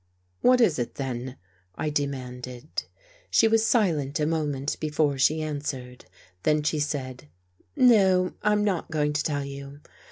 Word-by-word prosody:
" 90 0 -44
What 250 0 +5
is 170 - +3
it, 120 - -3
then? 130 -1 -4 0.2
" 90 - -38
I 155 - -2
demanded. 130 -2 -4 0.4
She 225 - +4
was 225 0 +3
silent 165 - +1
a 150 - +1
moment 150 -3 -1
before 150 -2 0
she 155 +3 +3
answered, 140 -4 -5 0.4
then 150 +4 +2
she 155 0 0
said: 130 - -3 0.5
"No, 195 -9 +4
I'm 210 0 +2
not 195 -5 -1
going 150 -2 0
to 150 - 0
tell 145 -2 -1
you. 140 +1 -8
150 Hz, 155 wpm, -26 LUFS, 135-165 Hz, 0.5 s, What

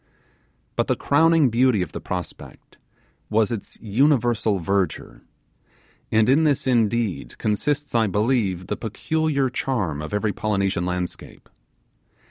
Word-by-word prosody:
But - - 0
the - - +1
crowning 160 -2 +3
beauty 120 -4 +3
of - - -8
the - - -7
prospect - - -8 0.5
was 110 0 +2
its 115 -4 -6
universal 120 -2 +2
verdure; 95 -2 -2 0.9
and 110 0 +3
in 140 +5 +4
this 145 -4 +1
indeed 115 -5 0
consists, 145 +7 -1
I 115 -2 +3
believe, 105 -3 0
the - - -3
peculiar 140 +5 -1
charm 100 - -2
of 75 - -6
every 105 0 0
Polynesian 100 -4 -1
landscape. 90 0 -5
110 Hz, 120 wpm, -23 LUFS, 100-130 Hz, 0.9 s, in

